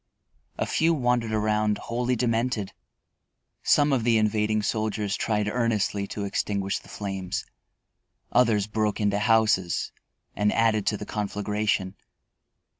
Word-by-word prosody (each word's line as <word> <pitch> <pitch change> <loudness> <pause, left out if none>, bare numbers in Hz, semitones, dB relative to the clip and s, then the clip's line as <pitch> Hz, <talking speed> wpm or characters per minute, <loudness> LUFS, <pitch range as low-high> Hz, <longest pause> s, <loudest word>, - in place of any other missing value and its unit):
A - - 0
few 165 +1 +2
wandered 125 -4 +1
around, 105 0 +1
wholly 125 +1 -1
demented. 115 -3 -1 0.9
Some 145 -1 +3
of 125 -4 +1
the 115 -1 +3
invading 110 0 +1
soldiers 105 -1 -1
tried 105 -2 0
earnestly 105 -3 0
to 100 0 -4
extinguish 100 0 -1
the - - -18
flames; 95 -3 -4 0.9
others 115 -5 +3
broke 105 0 -1
into 100 -1 +1
houses 110 -5 +2 0.4
and 105 +1 +2
added 110 -2 +2
to 105 - +1
the 105 - -7
conflagration. 105 -2 -1
105 Hz, 120 wpm, -26 LUFS, 105-115 Hz, 0.9 s, Some